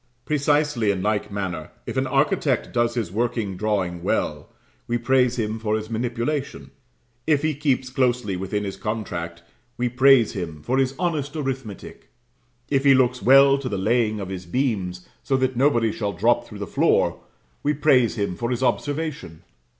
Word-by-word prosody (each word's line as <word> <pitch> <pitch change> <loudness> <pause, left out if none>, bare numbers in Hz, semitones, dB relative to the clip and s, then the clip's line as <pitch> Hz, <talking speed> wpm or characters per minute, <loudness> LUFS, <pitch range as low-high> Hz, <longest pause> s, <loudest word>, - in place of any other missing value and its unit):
Precisely 145 -5 +1
in 95 -2 0
like 105 0 -1
manner, 90 -6 -4 0.2
if - - -5
an - - 0
architect - - +1
does 120 0 +1
his 110 -7 -2
working 110 -2 -1
drawing 95 -3 -1
well, - - -2 0.4
we 120 - 0
praise 125 0 +2
him 110 -1 -2
for 110 -1 0
his 110 +1 -5
manipulation 120 +5 -3 0.6
if 150 -2 +2
he 155 0 +1
keeps 135 -3 -1
closely 125 -6 0
within 95 +3 -3
his 100 -1 -5
contract, 85 -6 -4 0.3
we 125 - 0
praise 130 -1 +5
him 80 -5 -6
for 130 - 0
his 135 0 +1
honest 155 -5 -2
arithmetic 135 -8 -6 0.6
if 135 -2 +1
he 135 -1 +6
looks 125 -1 +2
well 135 +2 +6
to 135 -2 -4
the 100 - -2
laying 110 +2 +1
of 95 -2 -5
his 90 -2 -6
beams, 95 -6 -2
so 135 - 0
that 130 -1 0
nobody 120 -4 +2
shall 105 -1 -3
drop 120 +6 +1
through 105 - -10
the 100 - -4
floor, - - +1 0.4
we 145 - +1
praise 135 -6 +3
him 100 -5 -2
for 120 +4 -3
his 125 +1 -1
observation. 140 - -2
120 Hz, 170 wpm, -23 LUFS, 100-135 Hz, 0.6 s, he